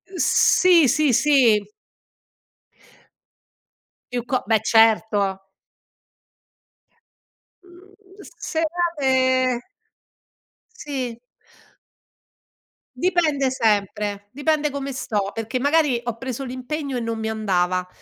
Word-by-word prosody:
Sì, 350 -2 +4
sì, 300 0 +2
sì. 250 -6 +4 2.5
Più 245 -1 -3
co 255 0 -1
beh 220 0 +2
certo. 215 -4 +2 2.2
Mhmm, 370 +2 -19 0.6
serate 265 -7 +1 1.1
Sì. 260 - -5 1.8
Dipende 305 -3 +1
sempre, 205 -3 -1
dipende 300 +2 0
come 275 0 -5
sto, 210 -6 -3
perché 225 +3 -4
magari 285 -3 +2
ho 235 -1 -4
preso 260 +1 -5
l'impegno 260 +2 -5
e - - -2
non 230 -1 -3
mi 220 0 -3
andava, 185 -4 -1
255 Hz, 80 wpm, -22 LUFS, 220-295 Hz, 2.5 s, Sì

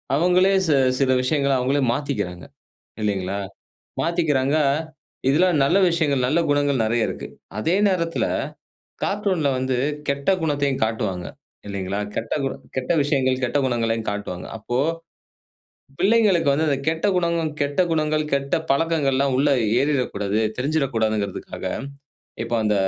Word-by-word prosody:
அவங்களே 180 +5 +4
சி 150 - +4 0.2
சில 135 -1 +3
விஷயங்களை 140 +1 +1
அவங்களே 135 +3 +1
மாத்திக்கிறாங்க. 105 -11 -3 0.6
இல்லைங்களா? 100 -2 -1 0.6
மாத்திக்கிறாங்க, 155 -4 +1 0.7
இதில 160 +6 +4 0.2
நல்ல 140 - +2
விஷயங்கள் 145 -6 +1
நல்ல 150 +6 +2
குணங்கள் 145 -3 +2
நெறைய 115 0 +1
இருக்கு. - - -5 0.3
அதே 165 - +1
நேரத்தில 170 -3 0 0.8
கார்ட்டூன்‌ல 195 -7 0
வந்து 130 0 0 0.3
கெட்ட 140 0 -2
குணத்தையும் 145 -3 0
காட்டுவாங்க. 105 -6 -2 0.4
இல்லைங்களா? 100 0 -3
கெட்டகு 135 +5 -1 0.3
கெட்ட 130 +6 -1
விஷயங்கள் 130 -3 +1
கெட்ட 130 +3 0
குணங்களையும் 115 -3 -1
காட்டுவாங்க. 100 -3 -5
அப்போ, 115 +3 -4 1.2
பிள்ளைகளுக்கு 195 -6 +3
வந்து 150 +3 +1
அந்த 140 - +1
கெட்ட 160 +4 0
குணங்களும், 170 -3 0
கெட்ட 145 +5 +1
குணங்கள் 155 -1 +1
கெட்ட 140 0 +1 0.2
பழக்கங்கள்லாம் 140 -3 +1
உள்ள 145 +2 +3 0.3
ஏறிறக்கூடாது, 125 -8 0 0.2
தெரிஞ்சிறக்கூடாதுங்கறதக்காக 115 -8 -1 0.8
இப்ப 115 +1 -3
அந்த 105 -1 +2
140 Hz, 115 wpm, -22 LUFS, 115-155 Hz, 1.2 s, அவங்களே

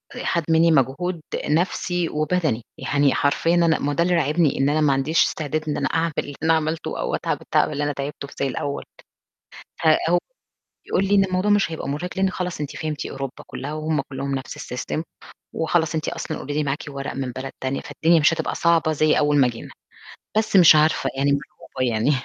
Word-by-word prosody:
آآ - - -5
خَد 170 - +1
منّي 165 +1 +5
مجهود 160 +5 +1 0.2
نَفْسي 175 +2 0
وبَدَني، 155 -5 0 0.2
يعني 140 -1 +2
حرفيًا 165 +4 +2
أنا 170 -2 +3
ما 145 - -1
هو - - 0
ده 170 - +2
اللي 175 0 +2
راعبني 155 -1 +2
إن 135 - +3
أنا 155 +1 +1
ما 145 -2 +4
عنديش 135 +5 +2
استعداد 155 0 -3
إن 150 - -1
أنا - - 0
أعمل 165 +1 0
اللي 145 - -5
أنا 165 0 +4
عملته 160 0 -2
أو - - -1
أتعب - - -2 0.2
اللي 145 -1 +2
أنا 145 0 -1
تعبته 140 +1 -5
في - - -14
زي 140 - +1
الأول، 140 +2 -3 1.0
فهو 165 +2 +4 0.7
يقول 190 - +1
لي: 200 - +2
"إن 195 -1 +5
الموضوع 185 +2 0
مش 205 -5 +3
هيبقى 160 - -5
مُرهِق 150 +6 -3
لإن 190 0 +2
خلاص 180 -3 -4
أنتِ 145 -1 -5
فهمتِ 155 -1 -4
أوروبا 135 -1 -6
كُلّها 145 +2 -6
وهم 155 -1 -1
كُلّهم 135 +1 -3
نَفْس 135 0 -5 0.2
الsystem 130 +5 -3 0.5
وخلاص 160 -1 0
أنتِ 155 - -1
أصلًا - - -5
already 145 +1 -1
معاكِ 140 +1 -2
ورق 140 0 -5
من 130 -2 -3
بلد 130 +2 -6
تانية،" 130 +1 -2
فالدنيا 165 +1 +2
مش 150 +2 +4
هتبقى - - -2
صعبة 165 -2 +2
زي 155 0 +2
أول 150 -1 +2
ما 135 - +5
جينا. 115 -2 -7 0.7
بس 220 -2 +1
مش 170 -4 +8
عارفة، 155 +1 +2
يعني 140 +1 +2
مرعوبة 130 -3 -3
يعني. 110 +5 +1
155 Hz, 200 wpm, -23 LUFS, 140-165 Hz, 1.0 s, مش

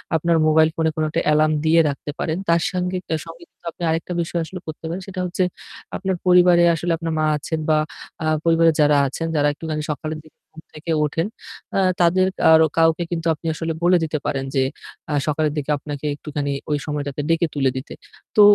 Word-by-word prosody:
আপনার 165 +1 +2
মোবাইল 155 0 +5
ফোনে 160 -1 +1
কোনো 155 0 0
একটা 165 +2 -1
এলার্ম 155 +1 +3
দিয়ে 165 +1 +5
রাখতে 140 +1 -5
পারেন। 160 +2 -1
তার 170 0 +4
সঙ্গে 180 0 -1 0.2
আ - - +3
সঙ্গে 165 +1 -11
কিন্তু - - -32
আপনি 175 - -9
আরেকটা 165 +2 -1
বিষয় 170 +1 -2
আসলে 185 +3 -8
করতে 155 0 -7
পারেন। 175 +4 -4
সেটা 185 -1 -6
হচ্ছে 180 +1 -1 0.5
আপনার 190 -1 -1
পরিবারে 180 -1 +6
আসলে 170 +2 -2
আপনার 165 -1 -3
মা 155 - +2
আছেন 160 +2 -3
বা 155 - +4 0.5
আ - - -1 0.2
পরিবারে 165 0 +5
যারা 150 -1 +5
আছেন 165 +5 -4
যারা 145 0 +3
একটুখানি 155 0 -4
সকালের 155 +2 -4
দিকে 155 - -21
ঘুম 160 - -12
থেকে 155 +2 -5
ওঠেন। 165 +5 -1 0.5
আ - - +3 0.2
তাদের 185 +2 +4 0.2
আর 160 - +8 0.2
কাউকে 165 +1 +3
কিন্তু 170 -1 -2
আপনি 160 +2 -13
আসলে 165 +1 -3
বলে 180 +1 +5
দিতে 155 -1 -1
পারেন 135 -1 -1
যে, 135 - +3 0.5
আ - - 0
সকালের 150 0 +1
দিকে 150 0 -2
আপনাকে 145 0 -7
একটুখানি 145 -1 -4 0.2
ওই 150 - +1
সময়টাতে 145 -1 -3
ডেকে 165 +1 +2
তুলে 135 -2 +2
দিতে। 130 - -7 0.4
তো 210 - +7
160 Hz, 200 wpm, -21 LUFS, 150-170 Hz, 0.5 s, আর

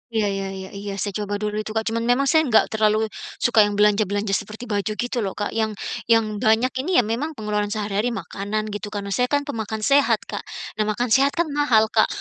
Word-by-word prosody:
Iya 215 -2 +2
iya 195 0 -3
iya 190 0 -7
iya, 200 0 -6
saya 200 +1 -2
coba 205 0 -2
dulu 210 0 -2
itu, 215 0 -5
Kak. 220 - +1
Cuman 230 0 -1
memang 270 +3 +3
saya 315 -2 +4
nggak 220 -2 +3
terlalu 215 -1 +2
i - - -5 0.4
suka 235 -2 +4
yang 205 - -3
belanja-belanja 205 0 +2
seperti 215 +3 -3
baju 210 -2 -2
gitu 245 0 -2
loh, 195 -3 -2
Kak. 205 - -3
Yang 220 -1 -1 0.3
yang 220 -2 +2
banyak 230 +2 +3
ini 350 +8 -1
ya 250 - +6
memang 260 +9 -3
pengeluaran 210 -2 -1
sehari-hari 210 +3 -1
makanan, 210 0 -3
gitu 205 0 -5
kan. 205 -1 -5
Nah 200 - -6
saya 250 +4 +1
kan 285 +2 +1
pemakan 220 -6 -4
sehat, 280 +2 +4
Kak. - - -6 0.4
Nah 215 - +2
makan 225 +2 -1
sehat 275 +2 +4
kan 340 -1 +1
mahal, 245 -7 +3
Kak. 220 - +4
215 Hz, 225 wpm, -23 LUFS, 205-245 Hz, 0.4 s, ya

